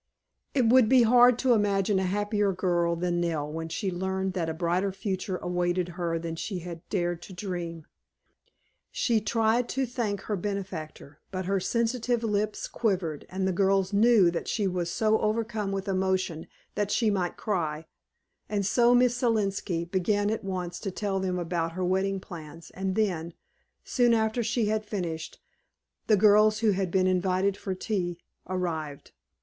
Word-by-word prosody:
It 255 -4 +3
would 235 -1 +5
be 255 -1 +6
hard 245 +1 +6
to 255 -1 +3
imagine 200 -2 +2
a 190 - 0
happier 205 0 +1
girl 175 -2 +1
than 175 0 -1
Nell 160 -4 -1
when 165 0 -4
she 190 +3 -2
learned 190 +1 -2
that 170 -3 -1
a - - -2
brighter 180 +3 0
future 190 -1 -3
awaited 175 0 -1
her 170 -1 -2
than 165 0 -4
she 190 +4 -4
had 170 -1 -7
dared 175 -3 -1
to 190 - -10
dream. 175 -4 -5 1.1
She 240 - +1
tried 225 +2 +1
to 270 0 0
thank 225 -5 -2
her 210 - -2
benefactor, 180 -7 -5
but 185 -1 -4
her 195 +1 +1
sensitive 235 +3 0
lips 210 -1 -1
quivered 180 -9 -2
and 190 0 -1
the - - +2
girls 195 +1 +2
knew 210 -4 +5
that 170 - -4
she 210 - 0
was 180 -2 -1
so 220 +3 +2
overcome 215 -1 -1
with 195 0 -3
emotion 185 -4 -1 0.3
that 205 -1 -1
she 220 0 +2
might 180 -3 -1
cry, 160 -6 -2 0.6
and 205 -2 -1
so 240 +4 +4
Miss 245 0 +4
Selenski 200 -7 0
began 205 +2 +1
at 220 - -3
once 180 -2 -4
to 195 - -4
tell 195 0 -2
them 185 -1 -1
about 170 -1 -2
her 185 +1 -2
wedding 190 +2 0
plans, 165 -2 -10
and 190 0 -3
then, 175 -6 -1 0.5
soon 240 -2 +3
after 220 +2 +1
she 220 0 0
had 215 +1 0
finished, 175 -6 -5 0.7
the 215 - +5
girls 215 +1 +5
who 220 -2 +4
had 190 -1 -1
been 185 +1 +2
invited 185 +1 +1
for 195 -1 -4
tea 185 -3 -2 0.3
arrived. 160 -6 -3
190 Hz, 165 wpm, -27 LUFS, 175-215 Hz, 1.1 s, be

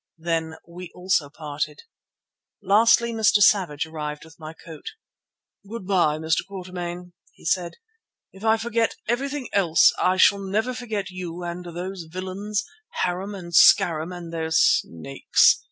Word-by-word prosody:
Then 160 -1 -2
we 175 +1 -9
also 180 -5 0
parted. 150 0 -5 0.8
Lastly 230 +3 +4
Mr. 220 -2 +2
Savage 185 -8 +3
arrived 150 -1 -6
with 160 +1 -18
my 155 -1 -8
coat. 165 - -11 0.8
"Goodbye, 185 -8 0
Mr. 160 0 0
Quatermain," 180 -2 -7 0.2
he - - -19
said. 175 +1 0 0.6
"If 195 - -15
I 220 0 +3
forget 230 0 -1
everything 270 +3 -2
else 175 -5 +4
I 185 +1 +2
shall 200 +1 +5
never 210 +6 -1
forget 220 -6 -4
you 180 -1 -6
and 175 +1 -5
those 175 +1 -6
villains, 190 +4 -4 0.4
Harum 190 +3 -2
and 170 -3 -9
Scarum 160 +1 +5
and 175 -2 -8
their 160 -1 -3
snakes. 135 - +3
180 Hz, 135 wpm, -24 LUFS, 160-200 Hz, 0.8 s, shall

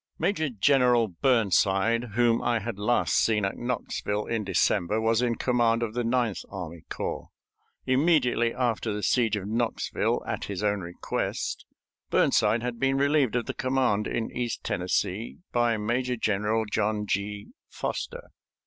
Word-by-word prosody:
Major 160 -7 0
General 125 0 +3
Burnside, 110 +1 +2
whom 120 -1 +3
I 120 -1 +1
had 110 -1 -5
last 120 +4 +1
seen 105 -3 +2
at 100 - -2
Knoxville 105 -3 -3
in 115 -2 -2
December, 100 +1 +1
was 115 +1 +2
in 120 -1 +1
command 120 -2 +2
of 110 -2 -3
the 120 0 -1
Ninth 115 -3 0
Army 85 -4 -7
Corps. - - -4 0.6
Immediately 130 -4 +3
after 120 -3 -1
the 105 0 -4
siege 115 -4 +2
of 100 -1 -4
Knoxville, 115 +1 -1
at - - -3
his 100 0 -4
own 105 -1 +1
request, 85 0 -4 0.4
Burnside 115 +1 +3
had 120 -1 -3
been 135 +1 +2
relieved 140 -4 +2
of 120 - 0
the - - -4
command 130 -6 +1
in 115 - -2
East 120 -2 -3
Tennessee 90 +4 -2
by 120 -2 +2
Major 125 +4 -1
General 110 0 0
John 105 0 -1
G. 100 +1 -3 0.2
Foster. - - -5
115 Hz, 150 wpm, -27 LUFS, 105-125 Hz, 0.6 s, General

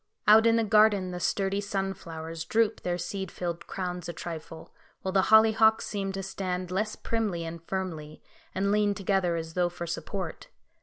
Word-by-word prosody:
Out 220 +2 +8
in 230 - +5
the 230 - +3
garden 210 -3 +4
the 180 - -5
sturdy 195 +2 0
sunflowers 170 -5 -4
droop 220 +5 +1
their 175 -1 -1
seed 190 +1 -4
filled 170 -2 -5
crowns 180 -2 -4
a - - -4
trifle, 165 -1 -8 0.3
while 190 - -1
the 190 0 +3
hollyhocks 220 0 +6
seem 195 -2 -3
to 195 0 -4
stand 185 -1 -3
less 215 +3 -1
primly 210 -7 -2
and 165 0 -6
firmly, 160 -5 -4 0.4
and 200 +1 +1
lean 205 -1 +2
together 190 -3 +1
as 165 -1 -5
though 180 0 +1
for 175 0 -6
support. 175 +1 -5
190 Hz, 170 wpm, -28 LUFS, 175-205 Hz, 0.4 s, Out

